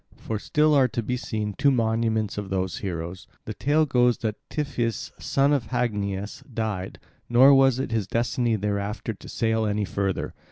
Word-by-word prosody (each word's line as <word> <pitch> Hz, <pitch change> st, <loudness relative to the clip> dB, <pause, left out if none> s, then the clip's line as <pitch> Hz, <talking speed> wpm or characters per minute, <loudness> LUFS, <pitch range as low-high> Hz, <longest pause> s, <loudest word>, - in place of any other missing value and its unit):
For 110 Hz, -2 st, -4 dB
still 150 Hz, +6 st, +2 dB
are 135 Hz, -3 st, +5 dB
to 120 Hz, -1 st, -3 dB
be 125 Hz, +4 st, -1 dB
seen 110 Hz, -4 st, -3 dB
two 140 Hz, -, +3 dB
monuments 110 Hz, -3 st, +1 dB
of 100 Hz, -2 st, -6 dB
those 95 Hz, -1 st, -1 dB
heroes. 90 Hz, -1 st, -5 dB, 0.2 s
The 110 Hz, -, -4 dB
tale 150 Hz, +8 st, +2 dB
goes 125 Hz, -3 st, +3 dB
that 110 Hz, -2 st, -2 dB, 0.2 s
Tiphys 125 Hz, -6 st, -2 dB
son 140 Hz, +1 st, +2 dB
of 130 Hz, -6 st, 0 dB
Hagnias 105 Hz, -5 st, -2 dB
died; 110 Hz, -5 st, -3 dB, 0.3 s
nor 130 Hz, +4 st, +7 dB
was 135 Hz, -2 st, +5 dB
it 130 Hz, -2 st, -3 dB
his 110 Hz, -4 st, 0 dB
destiny 120 Hz, 0 st, 0 dB
thereafter 105 Hz, +2 st, -2 dB
to 100 Hz, -, -13 dB
sail 110 Hz, -1 st, 0 dB
any 105 Hz, 0 st, 0 dB
further. 100 Hz, -1 st, -2 dB
110 Hz, 170 wpm, -25 LUFS, 105-125 Hz, 0.3 s, nor